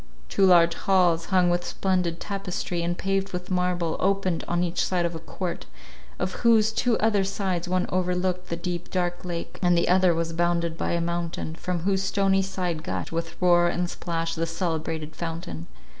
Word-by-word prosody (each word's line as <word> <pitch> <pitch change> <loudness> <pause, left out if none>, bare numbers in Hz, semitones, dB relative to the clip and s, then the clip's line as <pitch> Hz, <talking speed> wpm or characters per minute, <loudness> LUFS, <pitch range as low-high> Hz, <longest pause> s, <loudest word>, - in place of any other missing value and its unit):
Two 195 - +4
large 170 -2 +6
halls, 175 -4 +2
hung 180 -2 +3
with 175 0 0
splendid 180 -3 -1
tapestry, 185 -3 -3
and 175 +1 -1
paved 195 0 -1
with 180 +1 -5
marble, 180 -2 0
opened 195 -3 +1
on 175 0 +1
each 175 0 0
side 180 -2 +1
of 170 - -2
a 165 - -5
court, 175 +2 -5 0.5
of 185 +1 -2
whose 220 -2 +5
two 230 +1 +1
other 210 -2 +2
sides 190 -3 -2
one 185 0 +1
overlooked 180 0 -1
the 170 - -1
deep 175 0 -4
dark 175 -1 -1
lake, 175 -2 -5
and 175 -2 +4
the 170 - +2
other 180 -1 +4
was 165 0 -2
bounded 170 -1 0
by - - -1
a 170 - +1
mountain, 170 -1 -3
from 175 +1 -3
whose 190 +2 +1
stony 195 0 +2
side 180 -4 -2
gushed, 175 - -4
with 165 0 -4
roar 175 -1 +5
and 175 0 -1
splash, 165 -1 -3
the 165 0 -1
celebrated 160 -2 -3
fountain. 165 - -5
175 Hz, 185 wpm, -26 LUFS, 170-185 Hz, 0.5 s, large